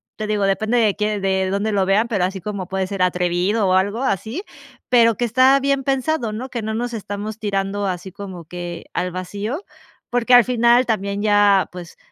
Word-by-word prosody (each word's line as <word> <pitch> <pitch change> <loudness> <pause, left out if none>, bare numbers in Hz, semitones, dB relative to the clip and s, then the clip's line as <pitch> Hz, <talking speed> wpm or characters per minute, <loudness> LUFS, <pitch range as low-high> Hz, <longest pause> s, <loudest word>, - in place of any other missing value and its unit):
te 215 - -4
digo, 210 -1 0
depende 220 +4 +1
de 215 -4 +2
quié 210 0 -1
de 190 -1 0
dónde 200 +2 -1
lo 195 -2 +1
vean, 205 +4 +2
pero 205 -6 0
así 190 +1 -2
como 200 -2 -5
puede 190 -1 -2
ser 195 -2 -1
atrevido 180 +3 +1
o 185 - +2
algo 200 +5 +1
así, 255 - -2 0.5
pero 230 -2 +5
que 240 - -1
está 260 +4 +4
bien 275 0 0
pensado, 270 -3 -1
¿no?, 250 +5 -5
que 235 -3 -4
no 220 +1 -3
nos 240 +2 -3
estamos 210 0 -5
tirando 200 -1 -2
así 185 0 -4
como 190 -3 -9
que 175 0 -7
al 180 0 -1
vacío, 205 - -5 0.5
porque 245 0 +1
al 245 -1 +9
final 240 +1 +3
también 200 -2 -1
ya, 205 -2 +4
pues, 175 -1 -10
205 Hz, 200 wpm, -20 LUFS, 190-235 Hz, 0.5 s, al